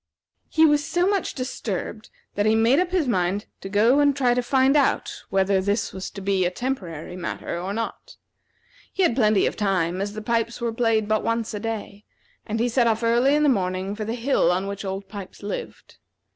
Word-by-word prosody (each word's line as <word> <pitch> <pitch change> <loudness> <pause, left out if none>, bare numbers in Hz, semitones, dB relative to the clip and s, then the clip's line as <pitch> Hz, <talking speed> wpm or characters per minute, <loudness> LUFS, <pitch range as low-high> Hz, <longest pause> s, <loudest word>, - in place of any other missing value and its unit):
He 320 0 +4
was 295 -1 +3
so 350 +5 +1
much 400 -1 0
disturbed 220 -5 -4 0.2
that 205 +1 +1
he 220 - +4
made 230 +6 +4
up 365 -1 +1
his 355 -6 0
mind 195 -2 0
to 195 - -7
go 225 +7 +4
and 285 -1 +4
try 255 -3 +2
to 250 - +1
find 265 +2 +3
out 290 - +1
whether 195 0 +2
this 200 +3 -1
was 190 0 -5
to 195 - -9
be 195 -1 +1
a 175 - +2
temporary 180 - -4
matter 170 -1 -4
or 190 +2 -4
not. 225 +2 -5 0.8
He 385 - 0
had 245 - +3
plenty 215 -5 +3
of - - -1
time, 185 -3 0
as 205 +1 -3
the 215 0 -6
pipes 235 0 -1
were 235 -1 -2
played 225 -2 +1
but 215 0 +1
once 230 -1 -1
a 210 - -3
day, 215 -2 -5 0.4
and 220 +1 -2
he 235 - +2
set 240 0 +2
off 225 0 +1
early 240 +5 +3
in 300 - +2
the - - +4
morning 190 -4 0
for 215 - -4
the 225 +2 -3
hill 235 -8 +2
on 185 +2 0
which 200 0 -5
Old 195 0 -5
Pipes 200 -1 -9
lived. 205 - -7
220 Hz, 215 wpm, -24 LUFS, 195-250 Hz, 0.8 s, He